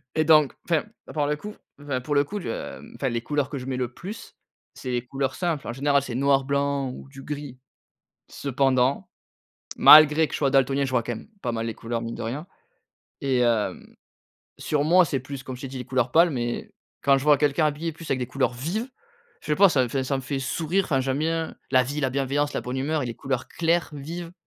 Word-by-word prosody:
Et 155 - +3
donc 155 -3 +5 0.2
enfin, 165 -3 +2 0.2
à - - -10
part 150 -2 0
le 150 - +1
coup 210 +8 -9 0.3
enfin, 140 -3 -3
pour 145 +3 -2
le 140 - +5
coup, 205 +9 -5
heu 115 - -5
enfin 135 - -1
les 120 -1 -2
couleurs 145 +2 -1
que 145 - -4
je 125 - -6
mets 130 -1 -3
le 125 -1 -3
plus 210 +5 -9 0.4
c'est 130 - -5
les 120 -1 -1
couleurs 135 0 -2
simples. 170 -6 -2
En 120 - -3
général 140 +2 +2
c'est 125 -3 -6
noir 135 +1 +2
blanc 140 -1 0
ou 130 - -10
du 135 0 -11
gris. 145 -3 -6 0.7
Cependant, 135 -1 +1 0.7
malgré 155 +1 +8
que - - -11
je - - -1
sois 140 -2 +2
daltonien, 135 0 +3
je 135 - -4
vois 125 -2 +1
quand 120 +1 -3
même 110 - -11
pas 120 - -1
mal 115 0 -2
les 115 - -3
couleurs 115 0 -4
mine 115 0 -5
de - - -7
rien 135 +8 -4 0.8
et 135 -2 +1
hem, 115 -3 0 0.6
sur 145 -1 0
moi, 180 +4 +6
c'est 140 -4 -2
plus, 135 +1 -7
comme 130 -1 -7
je 130 - -12
t'ai 135 - -5
dit, 130 - -7
les 125 - -5
couleurs 125 -2 0
pâles 170 +1 +6
mais 120 -3 -3 0.3
quand 140 0 +5
je 135 - -6
vois 150 -2 +5
quelqu'un 150 +2 +2
habillé 155 +3 -2
plus 160 +1 -10
avec 130 - +1
des 125 - -2
couleurs 130 +1 0
vives, 175 - -3 0.5
je - - -13
sais 150 - +1
pas 200 0 +7
ça 135 -5 +3
me - - -4
fait 135 +2 -1
ça 135 +1 0
me 135 - -5
fait 135 +2 -3
sourire. 165 +8 0
Enfin, 135 -6 +1
j'aime 130 +1 -1
bien 165 +1 -1 0.2
la 130 -1 +6
vie, 145 +4 -3
la 135 -2 +1
bienveillance, 140 +2 0
la - - -1
bonne 125 +1 -4
humeur 150 +3 0
et 125 - -3
les 115 - -4
couleurs 135 -1 -3
claires, 170 +1 0
vives, 165 +4 -7
140 Hz, 240 wpm, -25 LUFS, 130-150 Hz, 0.8 s, malgré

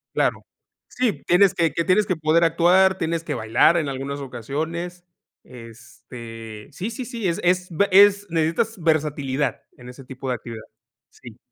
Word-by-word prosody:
Claro, - - 0 0.4
sí, 245 -5 -2
tienes 180 +2 +4
que 165 -2 +1
que 165 +3 -2
tienes 200 +3 +3
que 185 - -2
poder 160 +2 +2
actuar, 180 +3 +4
tienes 165 -1 -2
que - - -4
bailar 115 +10 +3
en 155 -4 -1
algunas 140 +1 -5
ocasiones, 160 +8 -5 0.4
este, 115 -2 -11
sí, 190 +9 -4
sí, 255 +1 -6
sí, 230 -5 -4
es 170 - -2
es 180 +1 +1
be 200 +5 +1
es 200 +1 +6
necesitas 165 +7 0
versatilidad 145 -3 -1 0.2
en 125 -1 -13
ese 125 +2 -11
tipo 130 +1 -9
de 125 - 0
actividad 115 -1 -9 0.5
Sí. 120 -2 -14
160 Hz, 160 wpm, -22 LUFS, 130-180 Hz, 0.5 s, es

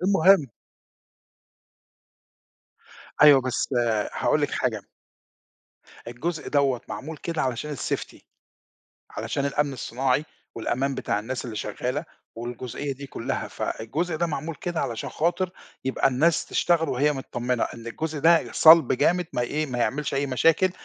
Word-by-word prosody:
المهم 190 -5 +5 2.7
أيوه، 145 -3 +8
بس 130 0 -2 0.4
هاقول - - +1
لِك - - 0
حاجة - - -1 1.3
الجزء 155 +7 -4
دوّة 140 -4 +2
معمول 155 +3 -6
كده 165 0 -3
علشان 135 +3 -2
الsafety، - - -4 0.9
علشان 140 - -3
الأمن 140 0 0
الصناعي 130 +2 -1 0.3
والأمان 135 +4 -1
بتاع 105 -5 -1
الناس 120 +5 -4
اللي 115 -3 -6
شغالة 130 +8 -3 0.3
والجزئية 120 +4 -5
دي 140 +1 -9
كُلّها. - - -4
فالجزء 160 +9 -3
ده 170 +2 0
معمول 160 0 -4
كده 170 +4 -3
علشان 115 -2 -3
خاطر 175 +3 0 0.3
يبقى 130 - +2
الناس 155 +6 +2
تشتغل 165 -2 +1
وهي 145 +4 +2
متطمنة 125 -2 -2
إن 115 -1 -8
الجزء 155 +6 -4
ده 165 +3 +4
صَلب 160 -4 +7
جامد 170 +7 +2
ما 125 - 0
ي - - -1
إيه، 155 +4 -1
ما 125 -3 -4
يعملش 140 +5 -1
أي 140 +1 0
مشاكل، 165 +8 +3
140 Hz, 130 wpm, -25 LUFS, 125-160 Hz, 2.7 s, أيوه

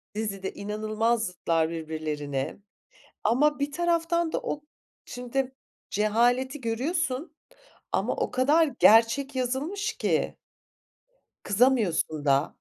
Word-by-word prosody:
Dizide 195 -3 -3
inanılmaz 215 +2 -1
zıtlar 165 -3 0
birbirlerine 155 -4 -4 0.6
ama 290 +7 +3
bir 285 +1 -1
taraftan 340 0 +1
da - - -1
o 295 - -3 0.4
şimdi 255 +2 -3 0.3
cehaleti 245 +6 +1
görüyorsun 275 +5 -2 0.6
ama - - +1
o - - -1
kadar 295 +5 +3
gerçek 230 +6 +5
yazılmış 295 - -1
ki. - - 0 1.1
Kızamıyorsun 200 - +2
da. 140 +2 +2
240 Hz, 95 wpm, -27 LUFS, 200-285 Hz, 1.1 s, gerçek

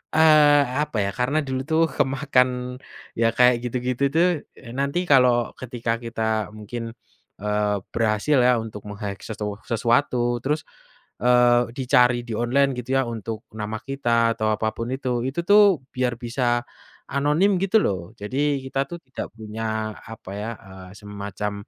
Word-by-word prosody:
eee, 150 -2 +6 0.2
apa 135 - -5
ya 100 - -1
karena 130 +5 +1
dulu 130 0 -2
itu 160 0 0 0.2
kemakan, 135 -1 +2 0.7
ya 115 0 +4
kayak 125 0 +6
gitu-gitu 125 +2 -2
tuh, 170 +2 +5 0.3
eee, 115 - -11
nanti 140 +5 0
kalau 125 -3 +5
ketika 115 -2 -3
kita 110 -2 -2
mungkin, 115 +2 -6 0.5
eee, 105 0 0 0.2
berhasil 115 +6 +1
ya 125 -1 +4
untuk 105 -2 -9
meng-hack 100 -1 -6
sesu 105 -2 -4
sesuatu 120 +1 +1
terus, 150 +3 0 0.6
eee, 120 0 +4
dicari 125 -2 +3
di 115 - -6
online 135 +4 +2
gitu 125 0 -6
ya 135 - +3
untuk 110 0 -5
nama 110 0 -4
kita 120 -4 +1
atau 110 -1 0
apa 110 +1 -1
pun 115 - -4
itu 130 -1 -3 0.2
itu 140 +6 -2
tuh 205 -7 +6
biar 125 -1 0
bisa, 120 0 0 0.5
anonim 155 +8 +2
gitu 195 +3 +3
loh 95 +1 -2
jadi 140 +7 0
kita 135 +1 -3
tuh 175 - -6
tidak 130 - -6
punya 110 0 -6 0.5
apa 110 -4 -9
ya, 105 +2 -4 0.2
eee, 95 -1 -11
semacam, 105 0 -5
120 Hz, 150 wpm, -23 LUFS, 110-135 Hz, 0.7 s, eee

